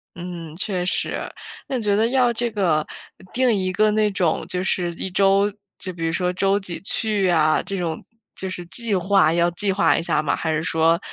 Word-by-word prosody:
嗯， 170 -3 -7
确 185 -2 -2
实。 - - -2 0.4
那 265 - -1
你 235 - -4
觉 205 -1 +2
得 220 +2 +3
要 250 -2 +3
这 235 +1 -1
个 175 -8 +1 0.5
定 255 -1 +3
一 185 -2 -1
个 215 +3 +3
那 210 0 +2
种 175 -4 0
就 180 0 -2
是 180 -2 0
一 190 - -4
周 195 +2 +3 0.3
就 185 -1 -6
比 165 -1 -4
如 165 - 0
说 180 +1 0
周 195 +2 +2
几 180 -4 -6
去 210 0 0
呀， 155 -3 +3
这 195 - -4
种 165 -3 -3 0.3
就 190 - -5
是 180 -1 -6
计 225 +5 -4
划， 190 -2 +3
要 170 0 +3
计 195 +3 -1
划 195 +1 +3
一 - - -1
下 165 - +1
吗， 155 - 0
还 160 - -2
是 155 0 0
说 165 +1 +2
185 Hz, 225 characters per minute, -22 LUFS, 170-205 Hz, 0.5 s, 得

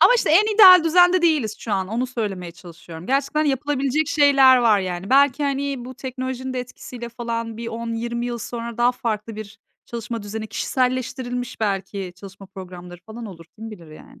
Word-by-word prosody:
Ama, - - +7
işte, 475 - +1
en 420 +6 +4
ideal 370 -5 +9
düzende 355 +2 +4
değiliz 290 -11 +1
şu 220 - -5
an. 190 -2 -1
Onu 235 +5 -2
söylemeye 200 -8 -5
çalışıyorum. 170 -1 -12
Gerçekten 280 +3 0
yapılabilecek 280 +1 0
şeyler 275 -4 +5
var, 225 -4 +3
yani. 185 +2 -5
Belki, 280 +1 +4
hani, 275 -2 -2
bu 255 - -9
teknolojinin 260 0 -5
de 255 - -2
etkisiyle 245 -1 -9
falan 230 -1 -5
bir 230 0 -6
10-20 235 +1 -4
yıl 240 -1 -4
sonra 235 0 -6
daha 245 +1 +3
farklı 225 -3 -4
bir 215 +1 -9 0.3
çalışma 235 -1 -6
düzeni, 220 +2 -6
kişiselleştirilmiş 250 +1 -3
belki 195 -2 -3
çalışma 195 +1 -12
programları 180 -2 -11
falan 225 +1 -8
olur. 170 -5 -11
Kim 225 +1 -8
bilir, 170 -7 -12
yani? 155 - -15
235 Hz, 175 wpm, -22 LUFS, 210-265 Hz, 0.3 s, ideal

